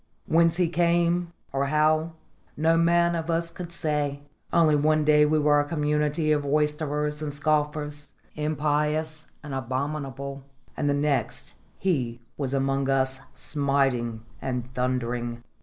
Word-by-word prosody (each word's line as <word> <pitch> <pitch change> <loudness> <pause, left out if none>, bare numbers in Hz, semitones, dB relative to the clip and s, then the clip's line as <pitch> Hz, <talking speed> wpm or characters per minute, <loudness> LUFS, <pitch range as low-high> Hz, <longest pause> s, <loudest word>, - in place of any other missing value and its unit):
Whence 165 0 +3
he 180 -2 +3
came, 170 0 +1 0.2
or 140 0 0
how, 155 +2 +2 0.4
no 160 +2 +3
man 170 +1 +3
of 165 -1 -3
us 170 0 0
could 175 0 -8
say. 150 -3 -1 0.3
Only 160 -3 +4
one 155 +1 +3
day 150 0 +5
we 155 +1 +2
were 150 -1 +4
a - - +3
community 150 0 0
of 150 -1 +3
roysterers 150 0 0
and 150 -1 -3
scoffers, 150 0 -1 0.2
impious 150 +1 -1 0.2
and 145 -2 -7
abominable, 135 +1 -4 0.3
and 145 - 0
the 140 - +2
next 145 -1 -1 0.2
he 125 -11 -1 0.2
was 135 -3 -3
amongst 135 0 0
us 135 0 +1 0.2
smiting 135 -6 0 0.2
and 125 -1 -4
thundering. 120 -2 -2
150 Hz, 135 wpm, -26 LUFS, 140-155 Hz, 0.4 s, day